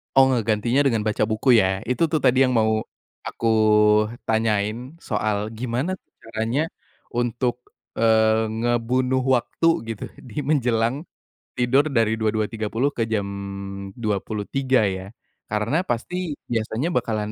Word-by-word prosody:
Oh, 135 Hz, 0 st, +6 dB
ngegantinya 115 Hz, +1 st, +1 dB
dengan 115 Hz, -4 st, +1 dB
baca 110 Hz, 0 st, 0 dB
buku 115 Hz, +2 st, +4 dB
ya? 95 Hz, -1 st, 0 dB
Itu 145 Hz, +7 st, +1 dB
tuh 155 Hz, -1 st, -1 dB
tadi 130 Hz, +1 st, +4 dB
yang 130 Hz, -2 st, +3 dB
mau 110 Hz, -1 st, +1 dB, 0.4 s
aku 115 Hz, -, -3 dB, 0.8 s
tanyain, 110 Hz, +4 st, -1 dB
soal 105 Hz, -1 st, -1 dB
gimana 120 Hz, +8 st, -2 dB
tuh -, -, -52 dB
caranya 115 Hz, +5 st, -1 dB, 0.5 s
untuk, 120 Hz, +1 st, -1 dB, 0.4 s
eee, 110 Hz, 0 st, +4 dB
ngebunuh 120 Hz, +3 st, 0 dB, 0.2 s
waktu 120 Hz, +6 st, 0 dB, 0.2 s
gitu 110 Hz, -, -6 dB
di 125 Hz, +1 st, -8 dB
menjelang 130 Hz, -2 st, +1 dB, 0.5 s
tidur 130 Hz, +4 st, +3 dB
dari 115 Hz, -5 st, +1 dB
22.30 110 Hz, +4 st, -1 dB
ke 115 Hz, -5 st, -2 dB
jam 110 Hz, -2 st, 0 dB, 0.7 s
23.00 110 Hz, +4 st, 0 dB
ya. 95 Hz, +1 st, -3 dB, 0.3 s
Karena 110 Hz, +9 st, 0 dB
pasti 165 Hz, +7 st, -3 dB, 0.2 s
biasanya 115 Hz, +7 st, -1 dB
bakalan 110 Hz, -6 st, -1 dB
115 Hz, 120 wpm, -23 LUFS, 110-130 Hz, 0.8 s, Oh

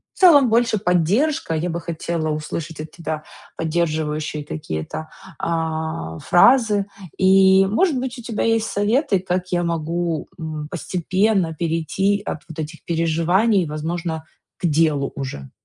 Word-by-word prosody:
в -, -, -17 dB
целом 290 Hz, -9 st, +7 dB
больше 230 Hz, -1 st, +2 dB
поддержка. 190 Hz, -, +1 dB
Я 160 Hz, +3 st, -1 dB
бы 170 Hz, 0 st, -2 dB
хотела 165 Hz, -1 st, -3 dB
услышать 155 Hz, +1 st, -5 dB
от 155 Hz, -, -7 dB
тебя 155 Hz, -2 st, -5 dB, 0.3 s
поддерживающие 155 Hz, -2 st, -1 dB
какие-то, 150 Hz, -, -5 dB, 0.3 s
а, 160 Hz, -, -2 dB
фразы, 210 Hz, 0 st, +4 dB, 0.3 s
и, 190 Hz, 0 st, +6 dB
может 275 Hz, -, +2 dB
быть, 260 Hz, 0 st, -4 dB
у 240 Hz, -, -9 dB
тебя 225 Hz, -2 st, -2 dB
есть 225 Hz, -1 st, +2 dB
советы, 205 Hz, -, +1 dB
как 180 Hz, 0 st, -2 dB
я 175 Hz, -1 st, +1 dB
могу, 170 Hz, -1 st, -2 dB
м, 155 Hz, -2 st, -5 dB
постепенно 185 Hz, +1 st, 0 dB
перейти 170 Hz, +5 st, 0 dB
от -, -, -3 dB
вот 160 Hz, -, -9 dB
этих 160 Hz, +1 st, -6 dB
переживаний, 170 Hz, +4 st, +2 dB
возможно, 160 Hz, +1 st, -3 dB, 0.3 s
к -, -, -4 dB
делу 155 Hz, -3 st, +2 dB
уже. 130 Hz, -, -6 dB
170 Hz, 135 wpm, -21 LUFS, 155-200 Hz, 0.3 s, целом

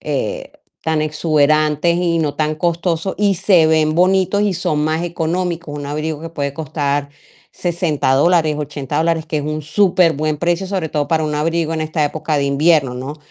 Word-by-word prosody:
eh, -, -, -3 dB, 0.3 s
tan 160 Hz, -1 st, 0 dB
exuberantes 155 Hz, +1 st, +2 dB
y 170 Hz, -2 st, +1 dB
no 150 Hz, -3 st, 0 dB
tan 155 Hz, 0 st, -1 dB
costosos, 170 Hz, +2 st, -1 dB
y 200 Hz, -1 st, +2 dB
se 170 Hz, -2 st, +4 dB
ven 155 Hz, -1 st, +2 dB
bonitos 190 Hz, +2 st, +2 dB
y 205 Hz, -3 st, +1 dB
son 160 Hz, -4 st, -1 dB
más 155 Hz, +2 st, 0 dB
económicos. 170 Hz, -2 st, -3 dB
Un 145 Hz, -, -6 dB
abrigo 155 Hz, +2 st, -4 dB
que 165 Hz, -, -6 dB
puede 140 Hz, -4 st, -3 dB
costar 145 Hz, -2 st, -2 dB, 0.4 s
$60 170 Hz, -6 st, -1 dB
dólares, 155 Hz, +1 st, +3 dB
$80 145 Hz, -1 st, -4 dB
dólares, 160 Hz, 0 st, 0 dB
que 155 Hz, -, -3 dB
es -, -, -3 dB
un 155 Hz, +1 st, -3 dB
superbuen 155 Hz, -3 st, +2 dB
precio, 175 Hz, +3 st, 0 dB
sobre 185 Hz, -5 st, -2 dB
todo 145 Hz, -1 st, -2 dB
para 160 Hz, -1 st, +1 dB
un 150 Hz, -1 st, -2 dB
abrigo 165 Hz, +1 st, 0 dB
en 160 Hz, -, -2 dB
esta 155 Hz, 0 st, -1 dB
época 155 Hz, 0 st, -2 dB
de 140 Hz, -, 0 dB
invierno, 140 Hz, -2 st, +2 dB
¿no? 135 Hz, +4 st, -6 dB
160 Hz, 180 wpm, -18 LUFS, 150-170 Hz, 0.4 s, se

